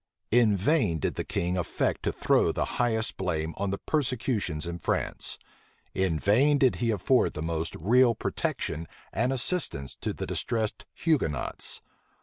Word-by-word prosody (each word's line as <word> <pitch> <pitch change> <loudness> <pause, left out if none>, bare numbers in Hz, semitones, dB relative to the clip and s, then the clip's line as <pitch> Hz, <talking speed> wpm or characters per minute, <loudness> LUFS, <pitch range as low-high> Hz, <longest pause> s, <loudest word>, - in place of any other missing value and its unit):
In 110 -3 +5
vain 105 - +2
did 75 - -1
the - - -3
king 90 +1 -1
affect 90 - -1
to - - 0
throw - - +2
the - - -1 0.2
highest 115 -2 +1
blame 80 -3 -1
on 100 0 -1
the 100 - -1
persecutions 115 - -1
in 85 0 -5
France: - - -2 0.6
in 95 -4 +1
vain 130 - +4
did 130 -2 +3
he 120 - 0
afford 115 +5 +2
the 75 - -3
most 80 0 -2
real 120 +6 +4
protection 80 -4 -2 0.3
and 125 - +1
assistance 130 - -1
to - - -3
the - - -4
distressed 110 -2 -2
Hugonots. 145 - -1
105 Hz, 150 wpm, -28 LUFS, 85-125 Hz, 0.6 s, In